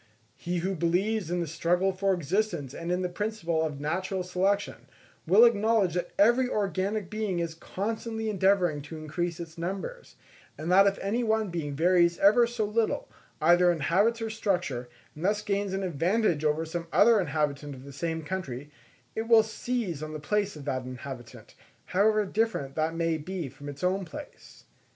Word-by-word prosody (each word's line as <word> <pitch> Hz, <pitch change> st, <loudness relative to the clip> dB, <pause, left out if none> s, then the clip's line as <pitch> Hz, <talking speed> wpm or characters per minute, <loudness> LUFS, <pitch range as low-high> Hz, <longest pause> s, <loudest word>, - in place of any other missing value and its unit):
He 175 Hz, +1 st, -3 dB
who 195 Hz, -, 0 dB
believes 185 Hz, +3 st, 0 dB
in 175 Hz, 0 st, 0 dB
the -, -, -1 dB
struggle 175 Hz, +4 st, +1 dB
for 195 Hz, +1 st, 0 dB
existence 175 Hz, -4 st, -1 dB
and 170 Hz, +3 st, -4 dB
in 180 Hz, +1 st, 0 dB
the -, -, +1 dB
principle 175 Hz, -4 st, -2 dB
of 150 Hz, -3 st, -3 dB
natural 185 Hz, +5 st, -2 dB
selection, 190 Hz, +3 st, -1 dB, 0.4 s
will 205 Hz, +8 st, +8 dB
acknowledge 220 Hz, -4 st, +3 dB
that 180 Hz, -, -2 dB
every 240 Hz, +5 st, +4 dB
organic 200 Hz, -1 st, -1 dB
being 215 Hz, -2 st, -2 dB
is 170 Hz, -1 st, -2 dB
constantly 220 Hz, +6 st, -4 dB
endeavouring 190 Hz, -6 st, +2 dB
to 150 Hz, +3 st, -9 dB
increase 165 Hz, +2 st, -3 dB
in 170 Hz, -, -3 dB, 0.2 s
numbers; 195 Hz, -, -5 dB, 0.4 s
and 160 Hz, +3 st, -3 dB
that 195 Hz, +2 st, +7 dB
if 195 Hz, -, +1 dB
any 225 Hz, +5 st, 0 dB
one 220 Hz, -2 st, +1 dB
being 150 Hz, -4 st, -3 dB
varies 170 Hz, +2 st, +3 dB
ever 225 Hz, +4 st, +5 dB
so 235 Hz, -2 st, -2 dB
little, 220 Hz, +2 st, 0 dB, 0.3 s
either 175 Hz, +2 st, +5 dB
in 170 Hz, -, -2 dB
habits 205 Hz, +10 st, +2 dB
or 225 Hz, -, -3 dB
structure, 175 Hz, -, -1 dB, 0.2 s
and 155 Hz, -, -9 dB
thus 210 Hz, +2 st, +1 dB
gains 200 Hz, -1 st, -1 dB
an 195 Hz, +1 st, -2 dB
advantage 175 Hz, 0 st, +1 dB
over 155 Hz, +1 st, +1 dB
some 170 Hz, +1 st, -5 dB
other 230 Hz, -2 st, +6 dB
inhabitant 145 Hz, -4 st, -1 dB
of 130 Hz, -, -12 dB
the 140 Hz, 0 st, -11 dB
same 160 Hz, +3 st, -3 dB
country, 150 Hz, -6 st, -5 dB, 0.4 s
it 225 Hz, +1 st, -3 dB
will 225 Hz, -1 st, +7 dB
seize 220 Hz, -, -3 dB
on 155 Hz, 0 st, -5 dB
the 155 Hz, -, -5 dB
place 205 Hz, +5 st, -1 dB
of 145 Hz, -2 st, -9 dB
that 130 Hz, -3 st, -2 dB
inhabitant, 125 Hz, -1 st, -9 dB, 0.3 s
however 210 Hz, +2 st, +2 dB
different 200 Hz, -10 st, -1 dB
that 160 Hz, +2 st, -1 dB
may 165 Hz, -1 st, 0 dB
be 175 Hz, 0 st, -4 dB
from 145 Hz, +3 st, -10 dB
its 145 Hz, +4 st, -9 dB
own 190 Hz, +2 st, +1 dB
place. 295 Hz, +10 st, -11 dB
180 Hz, 180 wpm, -28 LUFS, 160-210 Hz, 0.4 s, will